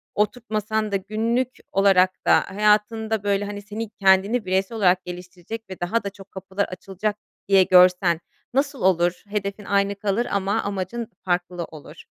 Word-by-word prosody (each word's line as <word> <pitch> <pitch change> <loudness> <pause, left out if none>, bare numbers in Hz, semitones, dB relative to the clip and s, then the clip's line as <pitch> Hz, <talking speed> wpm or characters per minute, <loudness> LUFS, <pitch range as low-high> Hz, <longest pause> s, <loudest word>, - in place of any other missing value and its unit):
oturtmasan 215 -1 -1
da - - 0
günlük 225 +6 0 0.2
olarak 190 -1 +3
da - - +6
hayatında 215 +1 +2
böyle, 200 0 +1
hani, 205 0 -6
seni 210 +2 -6
kendini 200 +2 +2
bireysel 190 +4 -1
olarak 185 -3 +3
geliştirecek 180 +4 -8
ve 185 - -8
daha 195 +6 -1
da 200 - -3
çok 195 0 -15
kapılar 190 +1 -3
açılacak 195 +3 -4 0.3
diye 195 -1 +6
görsen 180 -2 +5 0.3
nasıl 280 -1 0
olur? 175 -1 +2
Hedefin 200 0 -3
aynı 200 0 +1
kalır 205 +3 -1
ama 200 0 0
amacın 200 +4 -4 0.2
farklı 175 -1 -1
olur. 155 -2 -13
200 Hz, 150 wpm, -23 LUFS, 185-215 Hz, 0.3 s, da